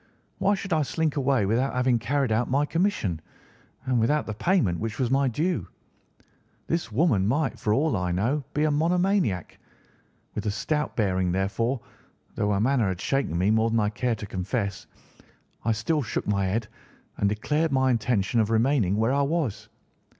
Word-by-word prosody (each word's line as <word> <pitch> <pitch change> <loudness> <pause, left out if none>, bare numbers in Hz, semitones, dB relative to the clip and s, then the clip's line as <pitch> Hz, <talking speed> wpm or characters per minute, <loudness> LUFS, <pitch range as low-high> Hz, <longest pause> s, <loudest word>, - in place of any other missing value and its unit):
Why 200 +1 +3
should 195 -2 -4
I 155 - +3
slink 155 +1 -1
away 135 -6 +2
without 125 +7 0
having 125 -1 +2
carried 130 +1 0
out 115 +2 +1
my 140 +3 +2
commission, 165 - -1 0.6
and 130 -2 +1
without 145 +7 +2
the 110 - -4
payment 110 - +1
which 110 -1 -4
was 130 -2 0
my 135 0 +3
due? 130 - -1 1.0
This 165 -9 -2
woman 110 - +2
might, 140 +5 0
for 105 - -1
all 145 +5 +2
I 90 -2 -1
knew, 120 +11 0
be 150 - +2
a 155 - +2
monomaniac. 170 - +1 0.7
With 105 +1 -4
a - - +2
stout 150 +8 -2
bearing, 95 -4 +1
therefore, 105 +7 -1 0.5
though 105 - -1
her 100 - +1
manner 120 -1 +2
had 95 -2 -2
shaken 135 - -1
me 95 +4 +2
more 110 +1 +3
than 115 0 +1
I 105 -1 +2
cared 115 +2 -1
to 105 - -6
confess, 100 +2 -3 0.8
I 115 - +1
still 130 +8 0
shook 110 - -3
my 100 -2 +1
head 105 +3 -1 0.5
and 100 - +2
declared 150 +10 0
my 130 -1 +3
intention 115 -2 +1
of 110 -1 +2
remaining 115 -3 +2
where 110 +4 +1
I 140 - +2
was. 145 - -1
120 Hz, 180 wpm, -26 LUFS, 105-145 Hz, 1.0 s, Why